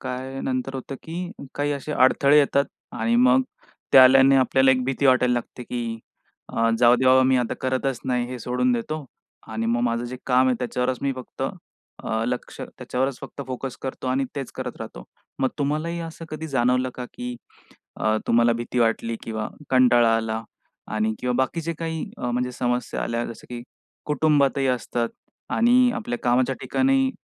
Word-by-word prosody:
काय 130 +1 -5
नंतर 130 +1 -2
होतं, 135 +1 -5
की 175 +2 -5 0.2
काही 145 0 0
असे 145 +2 -4
अडथळे 140 +2 +5
येतात 140 -1 +3 0.3
आणि 115 +1 +1
मग 125 +2 +5 0.5
ते - - +9
आल्याने 135 +1 +7
आपल्याला 130 0 +4
एक 130 -1 +2
भीती 135 +2 0
वाटायला 125 -1 +4
लागते, 120 +1 -5
की 115 -2 -4 0.5
अ, 115 0 +1
जाऊदे 120 +2 +5
बाबा 130 0 +6
मी 130 0 +3
आता 125 -2 0
करतच 130 -1 -1
नाही, 125 -1 0
हे 125 0 -6
सोडून 125 +2 0
देतो 145 +6 -3 0.5
आणि 110 +1 -2
मग 120 +1 +1
माझं 120 0 0
जे 125 +1 -6
काम 130 0 +4
आहे 130 - +3
त्याच्यावरच 125 0 -1
मी 140 -1 +1
फक्त, 130 -1 -8
अ, 110 0 -5
लक्ष, 125 0 -4
त्याच्यावरच 130 +1 -3
फक्त 140 - -7
फोकस 130 0 -5
करतो 130 -1 -5
आणि 135 +1 +1
तेच 135 -3 -5
करत - - -5
राहतो. - - -8 0.4
मग 130 - +3
तुम्हालाही 155 +4 -1
असं 165 0 -7
कधी 155 +1 -5
जाणवलं 125 -1 +1
का, 125 - -5
की 125 0 -5 0.6
अ, 110 0 +1
तुम्हाला 120 0 +4
भीती 120 +1 -3
वाटली, 115 0 +1
किंवा 110 -1 -4 0.2
कंटाळा 120 -3 +5
आला 110 0 -2 0.5
आणि 110 0 +1
किंवा 125 0 -1
बाकीचे 165 +5 -1
काही 160 -1 -3
अ, 125 - -3
म्हणजे 125 +1 -1
समस्या 125 0 -2
आल्या, 115 0 -2
जसं 115 - -10
की 120 -1 -6 0.4
कुटुंबातही 145 -2 +2
असतात 120 -1 -1 0.5
आणि 245 +2 +5
आपल्या 120 0 -3
कामाच्या 125 +2 +2
ठिकाणी 270 0 +2
130 Hz, 170 wpm, -24 LUFS, 120-135 Hz, 0.6 s, ते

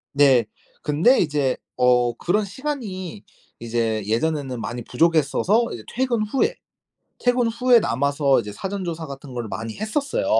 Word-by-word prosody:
네. 135 -5 +5 0.4
근데 160 - +4
이제 145 -5 +1 0.2
어 125 -1 +3
그런 210 +5 +1
시간이 205 - -5 0.4
이제 115 -2 -1
예전에는 130 +3 -1
많이 120 +1 -5
부족했어서 165 - +2
이제 110 - -8
퇴근 245 -3 0
후에 270 - 0 0.7
퇴근 245 -1 +2
후에 245 +1 +4
남아서 140 - +2
이제 105 - -7
사전 195 - -4
조사 165 -2 -4
같은 140 -1 -9
거를 120 -2 -4
많이 115 +1 -5
했었어요. 280 - -1
155 Hz, 305 characters per minute, -23 LUFS, -, 0.7 s, 네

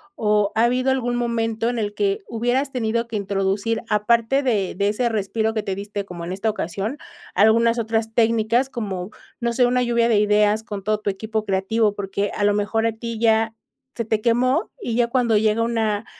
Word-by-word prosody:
o 210 -1 +1
ha 225 - +3
habido 255 +2 +1
algún 245 -2 0
momento 230 -1 -1
en 240 - -2
el 205 -1 -2
que 400 +1 0
hubieras 245 +4 -1
tenido 235 -2 -1
que 230 - -6
introducir, 200 +2 -1
aparte 230 +5 +2
de 215 -8 0
de 200 +2 +1
ese 235 +4 0
respiro 220 0 -1
que 215 - -1
te 190 - -3
diste 205 +1 -5
como 175 -3 -8
en 175 - -5
esta 200 +4 -1
ocasión, 205 - -3 0.4
algunas 230 +4 +4
otras 225 -1 -1
técnicas, 230 +2 +2
como, 195 -5 -4 0.3
no 235 0 -1
sé, 245 +1 +3
una 250 0 +2
lluvia 235 -1 +2
de 220 - +4
ideas 210 +1 +3
con 205 -3 -6
todo 215 +1 0
tu 205 -1 -1
equipo 220 +2 -3
creativo? 205 +3 +1
Porque 200 0 -2
a 205 - -1
lo 205 0 +3
mejor 225 +2 0
a - - +1
ti 230 0 -6
ya 225 -1 +2 0.4
se 230 - -3
te 220 0 0
quemó 255 +7 +1
y 235 - -3
ya 240 -1 +3
cuando 235 -3 +2
llega 215 +1 +2
una 225 -2 0
225 Hz, 200 wpm, -22 LUFS, 205-235 Hz, 0.4 s, algunas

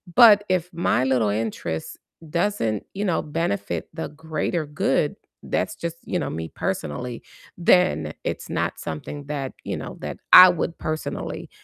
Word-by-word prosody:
but 210 -4 +8
if 180 -1 +1
my 165 -6 +1
little 125 -5 +2
interest 105 -7 -3 0.3
doesn't, 170 - 0
you 205 +1 -1
know, 175 - +1
benefit 170 +6 -2
the 160 - -4
greater 160 +1 -2
good, 145 0 0 0.3
that's - - -1
just 170 0 -5
you 180 - -1
know, - - -2
me 80 0 -5
personally, 115 +12 -3 0.4
then 175 - +3
it's - - -4
not - - -2
something 140 - -6
that, 140 -3 -4
you - - -3
know, - - -7
that - - -5 0.2
I 185 0 +12
would 170 -1 -1
personally 155 0 -4
155 Hz, 150 wpm, -24 LUFS, 120-175 Hz, 0.4 s, I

